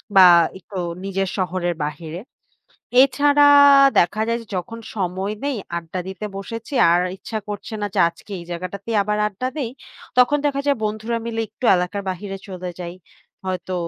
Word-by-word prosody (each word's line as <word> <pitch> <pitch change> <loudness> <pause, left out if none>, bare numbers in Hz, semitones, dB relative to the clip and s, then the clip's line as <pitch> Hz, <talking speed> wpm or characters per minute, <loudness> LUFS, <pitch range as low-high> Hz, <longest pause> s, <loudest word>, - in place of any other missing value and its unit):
বা 190 - +9 0.4
একটু 190 +1 -10 0.3
নিজের 195 -1 -1
শহরের 180 -2 -1
বাহিরে। 155 +3 -5 0.8
এছাড়া 285 +2 +4 0.5
দেখা 215 +5 +1
যায় 230 0 +1
যে, - - -13
যখন 225 +6 -6 0.2
সময় 190 +1 -2
নেই 280 -3 -1 0.2
আড্ডা 170 +2 -5
দিতে 190 +2 -6
বসেছি। 230 +6 -7 0.2
আর 175 - +4 0.2
ইচ্ছা 220 +3 -5
করছে 205 +1 -6
না - - 0
যে, - - +2
আজকে 170 +4 -16
এই 170 - -10
জায়গাটাতেই 195 +5 -4
আবার 210 +1 -1
আড্ডা 210 +5 -4
দেই। 265 -6 -2 0.5
তখন 250 +4 +5
দেখা 275 -1 +1
যায় 280 - +3
বন্ধুরা 215 +2 -2
মিলে 230 -1 -3
একটু 220 +3 -6
এলাকার 180 +3 -2
বাহিরে 195 +2 -5
চলে 185 -2 -6
যাই। 175 0 -6 0.5
হয়তো 185 0 -3
195 Hz, 160 wpm, -21 LUFS, 180-230 Hz, 0.8 s, বা